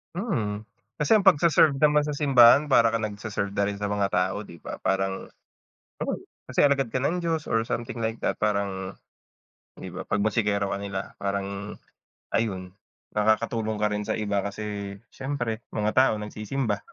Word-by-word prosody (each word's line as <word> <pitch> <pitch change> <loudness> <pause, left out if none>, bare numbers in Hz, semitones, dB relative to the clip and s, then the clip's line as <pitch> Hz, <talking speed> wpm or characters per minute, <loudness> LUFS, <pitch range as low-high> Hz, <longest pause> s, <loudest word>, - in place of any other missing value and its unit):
Mm, 110 - -2 0.4
kasi 185 +9 +5
ang 200 - -1
pagse-serve 160 -4 +5
naman 150 -1 +4
sa 150 - -2
simbahan 140 0 +6
para 115 -4 +5
kang 115 - 0
nagse-serve 105 -1 -3
na 100 - +3
rin 100 0 -4
sa 105 - -1
mga 100 -1 0
tao 95 +3 0
di 85 -3 -13
ba, - - -6
parang, 95 0 -1 0.8
oo, - - -1 0.3
kasi - - +1
alagad 140 -4 +3
ka 130 - 0
ng 160 +6 +1
Diyos 165 -3 -2
or 115 0 +1
something 120 +1 -4
like 115 0 -3
that - - 0
parang, 100 -3 -1 0.8
di - - -8
ba, - - -7
'pag 100 - +1
musikero 105 -2 +1
ka 100 - -2
nila, 100 -1 -5
parang, 100 +1 -3 0.6
ayun, 95 -5 -1 0.4
nakakatulong 110 +1 +1
ka - - +5
rin 105 0 -2
sa - - 0
iba 100 -2 -1
kasi 100 0 -4 0.2
siyempre 130 -5 -3 0.2
mga 105 0 +1
tao 130 -1 +4
nagsisimba 105 +1 -3
110 Hz, 165 wpm, -26 LUFS, 100-130 Hz, 0.8 s, simbahan